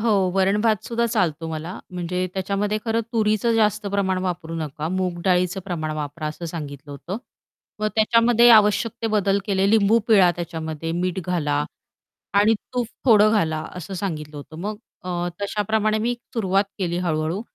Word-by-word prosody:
हो, - - -4
हो, 230 - +3 0.2
तुम्ही - - -8
वरण-भात 210 +2 +2
सुद्धा 235 0 0
चालतो 170 -8 0
मला 160 +3 -5
म्हणजे 180 +1 -2
त्याच्यामध्ये 200 +2 -1
खरं 225 0 +1
तुरीचं 215 +1 +2
जास्त 210 -1 +2
प्रमाण 195 -2 0
वापरू 175 -3 -3
नका, 155 -1 -4
मूग 180 -1 -2
डाळीचं 180 0 +2
प्रमाण 160 -5 -3
वापरा 150 +1 -4
असं 155 +3 -6
सांगितलं 150 -3 -7
होतं. 175 +7 -6 0.6
मग 215 - +1
त्याच्यामध्ये 230 +2 +5
आवश्यक 215 0 +5
ते - - +1
बदल 200 -2 +2
केले 195 -1 +2
लिंबू 220 +1 +4
पिळा 190 -5 +6
त्याच्यामध्ये, 165 -1 -4
मीठ 180 +1 -1
घाला 150 -5 0 0.8
आणि 220 +2 +4 0.2
तूप 245 -2 0 0.2
थोडं 215 -4 +6
घाला, 160 -7 +1 0.2
असं 180 +2 -6
सांगितलं 155 -6 -4
होतं 150 +2 -10
मग 210 +3 -3 0.3
अ, 175 -1 -2
तशाप्रमाणे 215 +1 0
मी 235 +3 0 0.2
सुरुवात 195 -2 +2
केली 175 -3 -1
हळू-हळू. 160 +3 -1
190 Hz, 160 wpm, -23 LUFS, 165-215 Hz, 0.8 s, पिळा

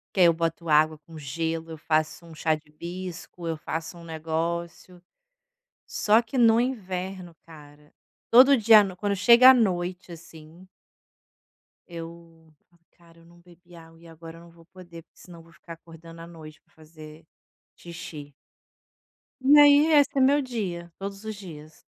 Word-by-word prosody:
Que - - -2
aí 180 - +6
eu 170 - +4
boto 165 +1 -4
água 155 0 +2
com 160 +2 -15
gelo, 160 +3 -5
eu 160 - -8
faço 155 +1 -2
um 165 -1 -14
chá 160 0 0
de 155 0 -8
hibisco, 175 +2 -9
eu 165 - -2
faço 160 +2 -7
um 170 - -13
negócio. 170 +2 -5 0.8
Só 215 +2 +2
que, 230 +3 -12
no 230 -2 +4
inverno, 190 -7 -5
cara, 150 -2 -17 0.4
todo 265 +4 +7
dia, 220 -1 +6
no 190 -2 -7
quando 200 +1 -2
chega 235 +6 +7
à - - +5
noite, 185 -6 -2
assim 165 +1 -15 1.2
eu: 165 -1 -12 0.4
"Cara, 170 -1 -23
eu 165 - -21
não 170 +1 -21
bebi 175 0 -20
água, 165 0 -16
e 170 - -17
agora 165 0 -13
eu - - -15
não 170 - -17
vou 165 0 -21
poder, 175 -2 -14
porque - - -30
senão 170 -2 -14
vou 165 0 -21
ficar 170 0 -13
acordando 165 0 -15
à 165 - -11
noite 155 -2 -14
para - - -37
fazer 155 0 -15 0.5
xixi." 155 -4 -11 1.1
E 285 +3 +6
aí 290 +1 +6
,esse 290 -2 +4
é 270 - +2
meu 280 +3 +3
dia, 190 -10 -6
todos 195 +1 -8
os 220 0 -6
dias. 160 -5 -13
170 Hz, 165 wpm, -25 LUFS, 160-190 Hz, 1.2 s, todo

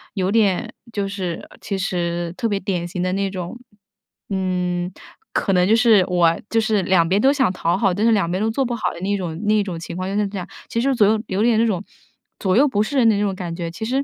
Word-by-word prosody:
有 190 -1 0
点 205 -4 +1 0.2
就 200 -2 -2
是 185 -4 -4
其 200 - -3
实 175 -2 -2
特 235 - 0
别 200 -2 0
典 180 -3 -2
型 180 0 -3
的 185 - 0
那 195 0 0
种， 185 +4 -6 0.7
嗯， 180 -2 -1 0.4
可 195 - 0
能 180 0 +3
就 220 - +5
是 225 -5 +5
我 170 -2 +3
就 225 - +2
是 215 -3 +1
两 180 -2 +3
边 195 - +3
都 270 +3 +5
想 260 -9 +2
讨 175 0 0
好， 195 -2 +2
但 205 +5 0
是 230 - +5
两 185 -5 +1
边 185 - -1
都 220 - +1
做 270 +5 0
不 240 - -2
好 235 - -1
的 170 - -9
那 200 +1 0
种 165 -4 -4
那 215 0 +3
种 185 -4 -5
情 170 +1 -7
况 185 0 -3
就 200 - -3
是 210 0 +1
这 195 0 -6
样。 180 - -5 0.2
其 230 - -1
实 270 0 +1
左 210 - +5
右 215 +1 +2
有 190 +2 -1
点 230 -2 +3
那 230 - +4
种 195 -3 -1 0.6
左 185 -2 +1
右 275 - +6
不 210 -5 +1
是 280 +6 -3
人 230 -3 +5
的 215 - +3
那 - - 0
种 200 -2 0
感 175 -2 -5
觉， 170 -1 -4
其 195 +6 -5
实 265 +4 0
195 Hz, 280 characters per minute, -21 LUFS, 180-220 Hz, 0.7 s, 右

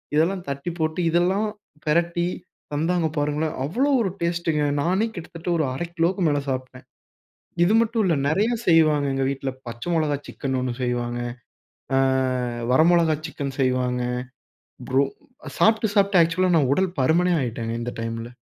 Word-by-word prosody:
இதெல்லாம் 175 +4 +1
தட்டி 140 +5 -3
போட்டு, 155 +2 -1
இதெல்லாம் 185 +5 +2 0.4
பெரட்டி 170 +2 +1 0.5
தந்தாங்க 165 +2 +1
பாருங்களேன். 150 +2 -1
அவ்ளோ 255 - 0
ஒரு 190 -5 0
டேஸ்ட்டுங்க, 170 -3 0 0.2
நானே 190 +8 +1
கிட்டத்தட்ட 170 +1 -7
ஒரு 155 - +1
1/2 170 +6 -3
கிலோக்கு 175 +3 +1
மேலே 145 -1 +1
சாப்ட்டேன். 130 -1 -5 0.8
இது 210 +5 +3
மட்டும் 230 -1 +1
இல்ல, 170 - +3
நெறைய 205 +9 +2 0.2
செய்வாங்க 155 -4 +4
எங்க 135 0 0
வீட்ல. 135 0 -3 0.2
பச்சை 120 +8 -7
மொளகா 155 -3 +1
சிக்கன் 130 -2 -3
1 125 -1 -1
செய்வாங்க. 120 -1 -1 0.8
ஆ - - +4 0.8
வர 155 - +5
மொளகா 165 -3 +3
சிக்கன் 140 -3 -5
செய்வாங்க, 125 -1 +1 0.9
ப்ரோ 135 +2 +4 0.5
சாப்பிட்டு 220 -1 +3
சாப்பிட்டு 195 -3 +4
ஆக்சுவலா 175 +2 +2
நான் 140 -4 +3
உடல் 185 -2 -1
பருமனே 170 +7 +3
ஆயுட்டேங்க 115 -2 -3
இந்த 120 - -4
டைமில. 115 0 -4
160 Hz, 145 wpm, -23 LUFS, 135-175 Hz, 0.9 s, வர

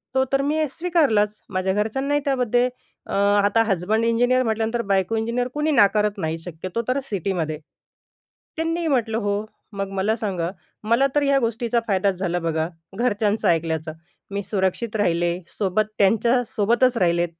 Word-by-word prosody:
तो 265 - +4
तर 275 - +3
मी 305 +2 +1
स्वीकारलाच. 275 -13 +1
माझ्या 190 0 0
घरच्यांनाही 270 +8 0
त्यामध्ये 250 -2 +2 0.4
अ, - - -5
आता 205 +2 +3
हसबंड 215 +2 0
इंजिनिअर 245 +2 +3
म्हटल्यानंतर 225 +1 0
बायको 190 +3 +1
इंजिनियर 235 +3 -1
कुणी 300 +1 0
नाकारत 210 -3 +3
नाही 160 -2 -2
शक्यतो 180 +6 -5
तर 260 +2 +1
सिटीमध्ये. 180 - -2 1.0
त्यांनी 330 +1 -1
ही 330 - -1
म्हटलं, 230 -6 +1
"हो." 205 -1 -1 0.3
मग 195 0 -3
मला 210 +4 +1
सांगा, 185 -7 -2 0.3
मला 235 +5 +3
तर 295 - +4
हया 275 -1 +3
गोष्टीचा 235 0 0
फायदाच 195 -1 +1
झाला 175 -2 -1
बघा, 160 -1 -1 0.3
घरच्यांचं 215 -3 +1
ऐकल्याचा. 160 -1 0 0.4
मी 200 0 -3
सुरक्षित 205 +3 -1
राहिले, 175 -2 +1 0.2
सोबत 205 +1 +1
त्यांच्यासोबतच 235 +3 +2
राहिले. 175 -2 +2
215 Hz, 145 wpm, -23 LUFS, 190-245 Hz, 1.0 s, तो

